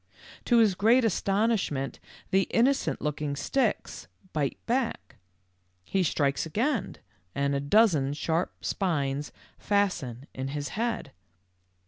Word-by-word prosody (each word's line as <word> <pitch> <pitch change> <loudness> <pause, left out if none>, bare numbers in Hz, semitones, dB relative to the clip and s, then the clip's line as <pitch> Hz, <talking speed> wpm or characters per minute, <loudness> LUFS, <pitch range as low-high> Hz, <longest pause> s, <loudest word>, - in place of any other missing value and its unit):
To 240 - +4
his 220 -4 +5
great 225 +6 +4
astonishment 200 - 0 0.3
the 190 0 +3
inno 250 +4 +4
cent - - -3
looking 150 -1 -2
sticks 240 - -1 0.3
bite 145 -3 -1
back. 240 0 -2 0.7
He 190 - 0
strikes 145 -5 +1
again, 225 - -1 0.4
and 140 0 +1
a 140 - +1
dozen 145 -3 +3
sharp 165 +3 -2
spines 145 -6 -1 0.3
fasten 175 - 0
in 130 0 -4
his 145 +1 -4
head. 225 -9 -2
180 Hz, 115 wpm, -28 LUFS, 140-225 Hz, 0.7 s, his